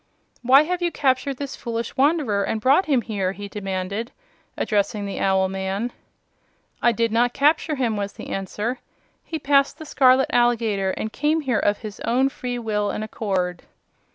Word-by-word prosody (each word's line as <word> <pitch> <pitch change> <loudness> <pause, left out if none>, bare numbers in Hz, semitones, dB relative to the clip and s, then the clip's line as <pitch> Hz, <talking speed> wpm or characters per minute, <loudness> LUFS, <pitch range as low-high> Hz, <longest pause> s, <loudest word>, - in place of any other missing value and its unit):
"Why 265 +4 +6
have 360 +3 -2
you 345 -1 +1
captured 270 -1 0
this 280 0 -5
foolish 235 -1 -4
wanderer 270 -8 +2
and 220 - -1
brought 275 - +3
him 265 -6 +2
here?" 195 -4 -2
he 205 +1 -7
demanded, 200 +2 -4 0.5
addressing 205 0 0
the 200 - -4
owl 190 -1 +2
man. 195 +5 -3 0.9
"I 240 - +4
did 230 0 0
not 240 +2 +2
capture 300 +2 +2
him," 240 -5 0
was 200 0 -3
the - - -9
answer. 210 +6 -3 0.4
"He 325 - -4
passed 280 -1 +2
the 315 - -9
scarlet 265 -2 +4
alligator 225 -5 +2
and 215 +3 -4
came 305 +2 +1
here 255 -7 0
of 205 0 +1
his 210 -2 -8
own 260 +3 +2
free 250 -2 -5
will 210 -3 -1
and 215 - -3
accord." 190 -5 -2
230 Hz, 170 wpm, -23 LUFS, 205-270 Hz, 0.9 s, Why